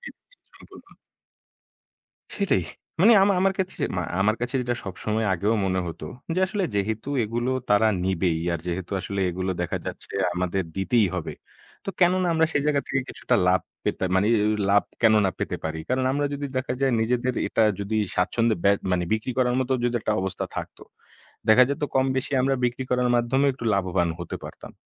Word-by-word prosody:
দিয়ে - - -8
দিচ্ছি - - -20 0.2
সম্পূর্ণ। - - -16 1.4
সেটাই। 200 -3 +1 0.4
মানে 220 +6 +7
আমা 200 +1 +4
আমার 195 0 +3
কাছে 190 -1 -2
যে - - +2
মা 90 - 0 0.2
আমার 110 +3 +2
কাছে 125 +2 -3
যেটা 120 -1 -1
সবসময় 105 +3 -2
আগেও 105 +6 +1
মনে 95 -1 0
হতো 80 -2 -7 0.3
যে, - - 0
আসলে 195 0 -1
যেহেতু 110 +4 -2 0.2
এগুলো 120 +3 -2 0.2
তারা 105 +2 +5 0.2
নিবেই, 90 -3 +1
আর 85 - -1
যেহেতু 90 +2 -4
আসলে 100 +1 -4
এগুলো 95 +2 -3
দেখা 90 - -2
যাচ্ছে - - -7 0.2
আমাদের 90 +1 -1
দিতেই 105 +2 +2
হবে। 90 -4 -3 0.5
তো 195 - -2
কেন 180 0 +6
না 180 - +1
আমরা 160 0 +4
সেই 145 - +1
জায়গা 145 -2 +2
থেকে 135 - 0
কিছুটা 125 - -1
লাভ 90 0 +4 0.2
পেতে, - - -1
মানে 95 +2 +3 0.2
এও 105 - +2 0.2
লাভ 100 0 +5 0.2
কেন 110 -1 +6
না 95 - +2
পেতে - - -2
পারি? 80 0 -3
কারণ, 130 +1 +1
আমরা 145 +1 0
যদি 145 0 -4
দেখা 130 -1 -1
যায় 135 -1 +2
নিজেদের 125 +2 0
এটা 115 - +1 0.2
যদি 100 +2 -2 0.2
স্বাচ্ছন্দ্যে 115 +5 +1
বে 100 - +6 0.2
মানে 90 -1 +1
বিক্রি 110 +3 -1
করার 125 -1 +2
মতো 130 0 -1
যদি 120 - 0
একটা 110 - 0
অবস্থা 95 -1 -3
থাকতো, - - -6 0.7
দেখা 125 +4 +8
যেত 140 - -3
কমবেশি 130 +1 0
আমরা 135 +1 +2
বিক্রি 125 +2 -1
করার 125 0 +2
মাধ্যমে 130 +4 +2
একটু 130 -2 -9
লাভবান 90 -2 +1
হতে 85 - -5
পারতাম। - - -10
115 Hz, 190 wpm, -25 LUFS, 95-130 Hz, 1.4 s, দেখা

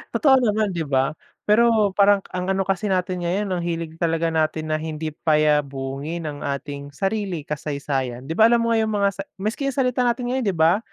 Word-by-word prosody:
totoo 275 -4 +5
naman 210 -3 +1
'di 165 -2 -2
ba? 135 +2 +1 0.3
Pero, 215 -1 +4
parang 200 0 +4
ang 180 0 -3
ano 195 0 +1
kasi 195 +2 -1
natin 185 -1 -1
ngayon 195 +2 -1
ang 180 - 0
hilig 165 -1 -4
talaga 165 -1 0
natin 155 0 -1
na 155 - +1
hindi 155 0 -4
payabungin 150 0 0
ang 145 -2 -5
ating 140 0 -5
sarili 195 -5 -2
kasaysayan. 140 -4 -3
'Di 160 - -6
ba, 220 +6 +6
alam 235 0 +3
mo 230 - +1
ngayon 220 -1 +2
yung 215 - -2
mga 200 - +5
sa 195 - -7
maski 215 +8 -2
yung 275 - -2
salita 250 -2 +1
natin 245 +1 -1
ngayon 260 -3 -1
'di 190 - 0
ba, 165 +5 +4
175 Hz, 205 wpm, -22 LUFS, 155-210 Hz, 0.3 s, ba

